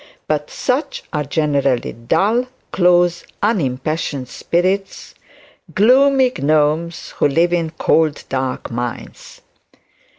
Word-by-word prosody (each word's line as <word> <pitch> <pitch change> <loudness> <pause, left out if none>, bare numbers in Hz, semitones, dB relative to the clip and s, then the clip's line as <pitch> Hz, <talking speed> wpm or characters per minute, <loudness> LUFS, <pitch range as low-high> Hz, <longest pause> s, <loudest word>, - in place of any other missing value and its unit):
But 150 -1 -1
such 265 +4 -2
are 150 -1 0
generally 140 -3 0
dull, 210 - +1 0.2
close, 175 -1 +3 0.2
unimpassioned 145 - -1
spirits, 185 +7 -2 0.6
'gloomy 260 +4 +4
gnomes 155 +3 0
who - - +3
live 170 +5 +2
in 170 -2 0
cold 160 -1 +1
dark 130 -1 -3
mines.' 120 0 -6
160 Hz, 95 wpm, -18 LUFS, 140-190 Hz, 0.6 s, gloomy